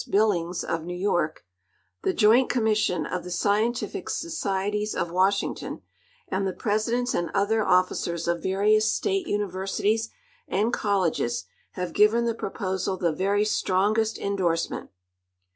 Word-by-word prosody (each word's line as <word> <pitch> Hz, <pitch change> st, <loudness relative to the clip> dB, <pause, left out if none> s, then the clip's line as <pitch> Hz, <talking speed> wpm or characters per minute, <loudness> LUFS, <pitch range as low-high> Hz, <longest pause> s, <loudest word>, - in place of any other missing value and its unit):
Billings, 180 Hz, -5 st, +1 dB
of 165 Hz, -1 st, -2 dB
New 180 Hz, +3 st, -3 dB
A'ork; 160 Hz, -2 st, 0 dB, 0.6 s
the -, -, +1 dB
Joint 230 Hz, +5 st, +4 dB
Commission 215 Hz, -8 st, +1 dB
of 180 Hz, -, -3 dB
the 180 Hz, -, -7 dB
Scientific 215 Hz, +6 st, 0 dB
Societies 210 Hz, -, -2 dB
of 170 Hz, -, -2 dB
Washington, 190 Hz, +3 st, 0 dB, 0.4 s
and 195 Hz, +1 st, -1 dB
the 190 Hz, -, -2 dB
presidents 230 Hz, +5 st, 0 dB
and 175 Hz, -, -1 dB
other 215 Hz, +2 st, +2 dB
officers 180 Hz, -3 st, +1 dB
of 170 Hz, -1 st, 0 dB
various 215 Hz, +3 st, +3 dB
state 390 Hz, -4 st, -1 dB
universities 205 Hz, +3 st, -1 dB, 0.4 s
and 215 Hz, +5 st, 0 dB
colleges 170 Hz, -, 0 dB, 0.3 s
have 180 Hz, -1 st, -4 dB
given 220 Hz, +3 st, +4 dB
the 230 Hz, -, +1 dB
proposal 190 Hz, -3 st, -3 dB
the 170 Hz, -3 st, 0 dB
very 200 Hz, +5 st, +1 dB
strongest 215 Hz, +2 st, +1 dB
in 200 Hz, 0 st, -2 dB
dorsement. 170 Hz, -3 st, -1 dB
200 Hz, 130 wpm, -26 LUFS, 180-215 Hz, 0.6 s, Joint